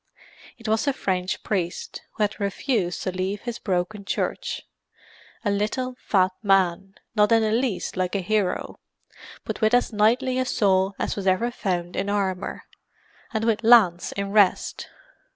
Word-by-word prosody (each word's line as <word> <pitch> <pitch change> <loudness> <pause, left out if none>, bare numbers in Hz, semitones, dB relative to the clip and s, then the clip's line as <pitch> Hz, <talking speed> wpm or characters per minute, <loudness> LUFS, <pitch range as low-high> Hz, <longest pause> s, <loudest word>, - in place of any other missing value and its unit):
It 230 - -9
was 220 +5 +1
the 280 - +2
French 185 -6 -2
priest, 180 -4 -3
who 215 - -1
had 210 - -1
refused 200 - -1
to 185 - -1
leave 185 +2 -3
his 240 -1 -5
broken 190 +2 -2
church: - - -3 0.8
a 205 - +2
little, 215 +6 -1
fat 185 -2 +3
man, 195 -1 +2 0.2
not 210 +1 +4
in 225 -1 +5
the 215 - +1
least 235 -3 -1
like 185 +1 -1
a 200 - +1
hero, 205 0 -1 0.6
but - - -5
with 220 +2 +4
as 245 -1 +1
knightly 240 +5 +2
a 255 - +1
soul 195 -5 +2
as - - -2
was 195 -2 -4
ever 225 +6 +2
found 180 -6 -3
in 200 +1 -1
armour 195 -2 -2 0.7
and 220 -2 -1
with 225 -1 +1
lance 215 -7 +5
in 200 0 -3
rest. 205 -3 +2
200 Hz, 160 wpm, -24 LUFS, 185-225 Hz, 0.8 s, in